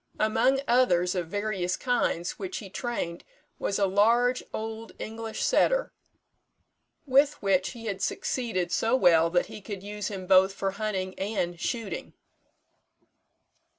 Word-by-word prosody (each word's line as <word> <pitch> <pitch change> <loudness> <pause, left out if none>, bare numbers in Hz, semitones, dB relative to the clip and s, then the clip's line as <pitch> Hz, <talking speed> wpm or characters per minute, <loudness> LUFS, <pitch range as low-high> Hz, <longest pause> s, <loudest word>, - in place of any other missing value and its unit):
Among 225 +5 +2
others 180 -8 +3
of 180 -3 -2
various 195 -1 -2
kinds 240 -8 -1
which 190 -2 -4
he 195 -3 -8
trained 210 -8 -4 0.4
was 195 - -1
a 200 - +3
large 235 +6 +3
old 220 +1 -6
English 225 0 -5
setter, - - +2 1.1
with 280 +2 +3
which 190 -2 +2
he 230 -1 -10
had 195 -3 -3
succeeded 190 -5 -1
so 225 +6 +2
well 170 -8 +5
that 175 +1 +2
he - - -10
could 200 -1 -7
use 210 0 -4
him 190 -3 -5
both 190 +1 +5
for 195 0 -1
hunting 195 -2 -3
and 185 -4 -2
shooting. 225 +1 -4
205 Hz, 135 wpm, -27 LUFS, 185-230 Hz, 1.1 s, well